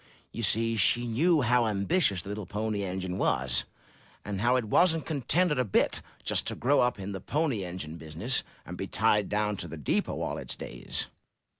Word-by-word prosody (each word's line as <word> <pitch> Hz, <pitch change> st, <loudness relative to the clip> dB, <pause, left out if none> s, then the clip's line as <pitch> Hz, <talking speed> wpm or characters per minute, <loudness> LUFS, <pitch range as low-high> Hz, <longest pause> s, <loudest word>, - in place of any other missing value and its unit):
You 115 Hz, -, -5 dB
see, 115 Hz, +2 st, +1 dB
she 120 Hz, +4 st, +3 dB
knew 150 Hz, +8 st, +3 dB
how 120 Hz, 0 st, +3 dB
ambitious 100 Hz, -, +1 dB
the -, -, -8 dB
little 105 Hz, -2 st, -5 dB
Pony 105 Hz, 0 st, -2 dB
Engine 95 Hz, 0 st, -3 dB
was, 65 Hz, -2 st, +2 dB, 0.6 s
and 100 Hz, -2 st, -3 dB
how 120 Hz, +3 st, +4 dB
it 125 Hz, -3 st, +1 dB
wasn't 165 Hz, -, +3 dB
contented 150 Hz, +2 st, +1 dB
a -, -, +4 dB
bit 105 Hz, -, +1 dB, 0.2 s
just -, -, 0 dB
to -, -, -2 dB
grow 140 Hz, +3 st, +2 dB
up 125 Hz, 0 st, +2 dB
in 100 Hz, 0 st, -5 dB
the 95 Hz, -2 st, -5 dB
pony 140 Hz, -, 0 dB
engine 85 Hz, -3 st, -6 dB
business, 80 Hz, +10 st, -1 dB, 0.2 s
and -, -, -7 dB
be -, -, -4 dB
tied 105 Hz, -1 st, +2 dB
down 105 Hz, 0 st, 0 dB
to 85 Hz, -, -5 dB
the 80 Hz, 0 st, -7 dB
depot 75 Hz, -, 0 dB
all -, -, -3 dB
its -, -, -5 dB
days. -, -, -4 dB
105 Hz, 190 wpm, -29 LUFS, 95-125 Hz, 0.6 s, how